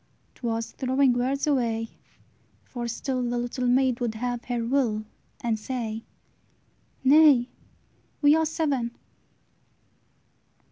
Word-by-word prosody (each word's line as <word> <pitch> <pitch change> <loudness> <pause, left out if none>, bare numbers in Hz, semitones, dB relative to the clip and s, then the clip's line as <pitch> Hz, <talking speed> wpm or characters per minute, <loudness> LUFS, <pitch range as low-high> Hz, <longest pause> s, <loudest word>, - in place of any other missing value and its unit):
'T - - -25
was 230 0 -2
throwing 260 0 +2
words 260 +3 0
away; 230 -6 0 0.7
for 240 -2 -5
still 255 +2 -2
The 245 0 -1
little 245 +1 -2
maid 255 0 +3
would 235 -3 -2
have 245 +1 -3
her 240 -2 -2
will, 230 -4 0 0.4
And 225 -2 -1
say, 225 -2 -4 1.0
"Nay, 275 -3 +6 0.7
we 290 +1 +6
are 320 - +3
seven!" 280 -7 -1
245 Hz, 110 wpm, -26 LUFS, 235-270 Hz, 1.0 s, Nay